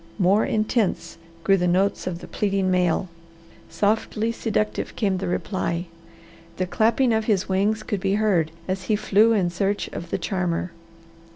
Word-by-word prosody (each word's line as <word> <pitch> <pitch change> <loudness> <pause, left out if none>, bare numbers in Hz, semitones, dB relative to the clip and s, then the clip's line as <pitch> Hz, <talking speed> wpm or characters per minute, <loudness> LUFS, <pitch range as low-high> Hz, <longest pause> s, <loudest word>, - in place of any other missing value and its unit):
More 195 +2 +3
intense 215 -4 -1 0.2
grew 195 0 +4
the 180 -1 +1
notes 185 +3 +1
of 175 -1 -4
the - - -9
pleading 195 -2 0
male. 180 0 +1 0.6
Softly 215 +1 0
seductive 215 -2 -2
came 195 -5 0
the - - -3
reply. 175 -1 -2 0.7
The 185 - 0
clapping 230 +6 +2
of 220 0 0
his 205 -5 +1
wings 200 +3 +1
could 205 - -2
be 195 +1 0
heard 195 -7 +2 0.2
as 185 0 -3
he 215 - +2
flew 210 +2 +3
in 185 -5 +1
search 195 +3 -1
of 170 - -7
the - - -1
charmer. 180 -3 -2
195 Hz, 160 wpm, -24 LUFS, 180-215 Hz, 0.7 s, grew